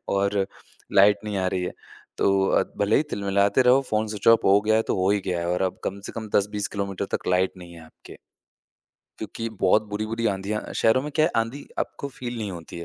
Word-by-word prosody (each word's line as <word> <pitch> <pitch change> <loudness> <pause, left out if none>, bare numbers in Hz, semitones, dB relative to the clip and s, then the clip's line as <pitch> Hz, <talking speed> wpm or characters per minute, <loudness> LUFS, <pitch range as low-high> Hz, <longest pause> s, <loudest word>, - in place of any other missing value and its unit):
और 100 0 +1 0.5
लाइट 100 +1 +6
नहीं 105 -2 -3
आ 95 - 0
रही 95 -1 -2
है। - - -4 0.5
तो 95 0 +3
अ, - - +3 0.2
भले 100 +2 +3
ही - - +3
तिल-मिलाते 100 +4 +2
रहो, 125 +2 +5
फ़ोन 110 0 +1
स्विच 105 +1 -1
ऑफ 115 0 +6
हो 100 +1 +5
गया 110 +1 +2
है, 110 - +3
तो - - -2
हो 95 +1 +2
ही 105 - +2
गया 90 -2 -1
है, 85 - -3
और 90 +2 0
अब 95 - -1
कम 100 +1 -3
से - - -7
कम 110 -2 -6
10-20 105 0 0
किलोमीटर 100 -1 -3
तक - - -15
लाइट 90 +1 +2
नहीं 85 -1 -11
है 80 - -12
आपके। 80 - -15 1.0
क्योंकि 115 0 -5
बहुत 95 +3 +4
बुरी-बुरी 110 +3 -2
आँधियाँ 100 +1 -2
शहरों 115 +3 +3
में 150 - -5
क्या 155 +1 +4
है, 170 - +2
आँधी 115 +5 -2
आपको 140 - -3
फ़ील 125 -3 -7
नहीं 105 -3 -3
होती 85 -1 -8
है। 85 - -6
100 Hz, 230 wpm, -24 LUFS, 95-110 Hz, 1.0 s, लाइट